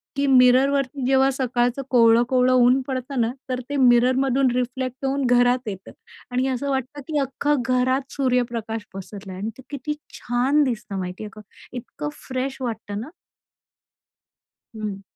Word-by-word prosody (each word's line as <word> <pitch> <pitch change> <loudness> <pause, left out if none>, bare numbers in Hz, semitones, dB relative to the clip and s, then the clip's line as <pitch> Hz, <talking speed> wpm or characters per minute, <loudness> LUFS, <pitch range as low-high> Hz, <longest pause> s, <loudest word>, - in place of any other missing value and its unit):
की 280 0 0
मिररवरती 265 +1 +4
जेव्हा 265 +1 +4
सकाळचं 250 0 0
कोवळं-कोवळं 245 +2 +4
ऊन 255 +1 +5
पडतं 260 -1 -2
ना, 230 +1 +1 0.2
तर 255 0 -1
ते 285 - -2
मिररमधून 255 +2 +4
रिफ्लेक्ट 255 +1 -3
होऊन 275 0 0
घरात 245 0 +3
येतं. 195 -2 -7 0.4
आणि 255 +2 0
असं 265 +2 -2
वाटतं, 265 +2 -3
की 305 -2 -2
अख्खं 275 +1 0
घरात 255 +2 +1
सूर्यप्रकाश 235 -5 -1
पसरला 195 0 -9
आहे. 185 - -7
आणि 215 - -2
ते 260 - -12
किती 285 +1 -4 0.2
छान 260 +5 +1
दिसतं, 225 -6 -3
माहिती 180 +3 -5
आहे 210 - -6
का? 215 - -10 0.4
इतकं 150 -10 -6 0.2
फ्रेश 260 +1 -3
वाटतं 220 -4 -4
ना. 260 - -8 1.7
हं. 210 -2 -5
255 Hz, 145 wpm, -23 LUFS, 235-270 Hz, 1.7 s, ऊन